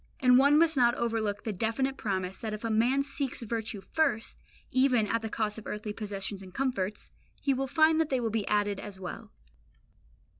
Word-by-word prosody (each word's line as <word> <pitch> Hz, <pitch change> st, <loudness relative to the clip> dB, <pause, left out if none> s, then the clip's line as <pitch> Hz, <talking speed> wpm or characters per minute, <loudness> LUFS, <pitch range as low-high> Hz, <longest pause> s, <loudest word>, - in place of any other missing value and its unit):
And 250 Hz, -1 st, +6 dB
one 285 Hz, +2 st, +6 dB
must 320 Hz, 0 st, +4 dB
not 240 Hz, -2 st, +4 dB
overlook 220 Hz, -3 st, -1 dB
the 220 Hz, -, -2 dB
definite 230 Hz, +7 st, -1 dB
promise 190 Hz, -5 st, -3 dB
that 220 Hz, -2 st, -3 dB
if 215 Hz, -, -10 dB
a 230 Hz, -, -1 dB
man 245 Hz, +6 st, +3 dB
seeks 275 Hz, -3 st, -4 dB
virtue 220 Hz, -2 st, -3 dB
first, 275 Hz, +1 st, -1 dB, 0.3 s
even 255 Hz, -4 st, +3 dB
at 230 Hz, +2 st, 0 dB
the 220 Hz, -, -4 dB
cost 215 Hz, 0 st, -2 dB
of 215 Hz, -, -11 dB
earthly 210 Hz, 0 st, -4 dB
possessions 200 Hz, -2 st, -5 dB
and 190 Hz, -1 st, -11 dB
comforts, 215 Hz, -4 st, -2 dB, 0.3 s
he 275 Hz, -, +1 dB
will 270 Hz, +1 st, -1 dB
find 315 Hz, +3 st, +4 dB
that 315 Hz, -, -1 dB
they 260 Hz, -, +1 dB
will 230 Hz, -2 st, -1 dB
be 220 Hz, -2 st, -1 dB
added 205 Hz, -1 st, +1 dB
as 200 Hz, -2 st, -8 dB
well. 180 Hz, -2 st, -7 dB
225 Hz, 195 wpm, -29 LUFS, 210-265 Hz, 0.3 s, And